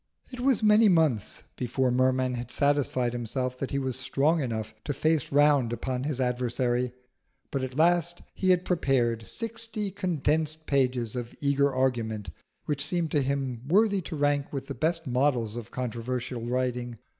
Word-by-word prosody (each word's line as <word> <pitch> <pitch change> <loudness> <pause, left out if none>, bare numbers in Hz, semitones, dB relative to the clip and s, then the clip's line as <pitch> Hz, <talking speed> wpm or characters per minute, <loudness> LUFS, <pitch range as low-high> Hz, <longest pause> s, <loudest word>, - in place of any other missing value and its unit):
It 250 - -8
was 255 -4 +2
many 210 0 +6
months 155 - +1
before 125 +1 0
Merman 130 0 +2
had 120 0 -5
satisfied 140 -4 +1
himself 125 +2 -2
that 135 - -3
he 140 - -2
was 130 -2 -2
strong 145 +5 +1
enough 110 -4 -3
to 145 - -2
face 155 -3 +1
round 145 -4 +4
upon 125 +2 -3
his 145 -3 -2
adversary. 125 0 0 0.6
But 135 -2 -1
at 130 -1 -5
last 175 +1 +2
he 185 - 0
had 180 0 +3
prepared 120 -9 +1
sixty 230 -3 -3
condensed 160 -4 -1
pages 125 -5 0
of 120 -1 -5
eager 140 0 +2
argument 120 -5 -1 0.3
which 145 -2 -1
seemed 165 +1 -1
to 145 - +2
him 135 -3 -2
worthy 200 +3 +3
to 165 -1 -6
rank 145 -1 +1
with 135 -2 -4
the 140 - -5
best 160 +5 0
models 125 -4 +1
of 120 -3 -6
controversial 125 0 -4
writing. 125 -1 -2
135 Hz, 160 wpm, -27 LUFS, 125-155 Hz, 0.6 s, many